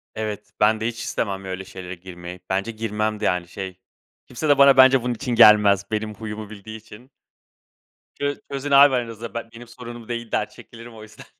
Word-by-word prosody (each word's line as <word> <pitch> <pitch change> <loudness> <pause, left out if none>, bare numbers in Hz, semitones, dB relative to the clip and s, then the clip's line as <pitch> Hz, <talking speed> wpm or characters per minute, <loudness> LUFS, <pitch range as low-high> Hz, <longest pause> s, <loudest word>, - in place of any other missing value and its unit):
Evet, 110 -2 -5
ben 110 +1 +3
de 110 - -1
hiç 115 -1 -5
istemem 95 -3 -3
öyle 95 0 -6
şeylere 95 -1 -8
girmeyi 90 0 -10
bence 100 +4 -1
girmem 110 -1 -3
de 105 - -2
yani, 90 -1 0
şey, 95 0 -8 0.5
kimse 150 +5 -4
de 145 - +5
bana 140 -1 +7
bence 130 -1 +7
bunun 125 - -1
için 120 0 -3
gelmez. 105 -3 +6
Benim 110 0 -2
huyumu 110 0 -7
bildiği 110 +1 -9
için. 115 +4 -15 1.1
"Çöz 145 0 -3
çözün 140 +1 -4
abi 140 -1 +7
aranızda 115 -2 -5
be 115 0 -5
benim 120 0 -11
sorunum 120 -1 -10
değil," 120 -1 -5
der - - -1
çekilirim 115 0 -13
o 110 - -12
yüzden. 110 - -14
110 Hz, 190 wpm, -22 LUFS, 100-120 Hz, 1.1 s, bana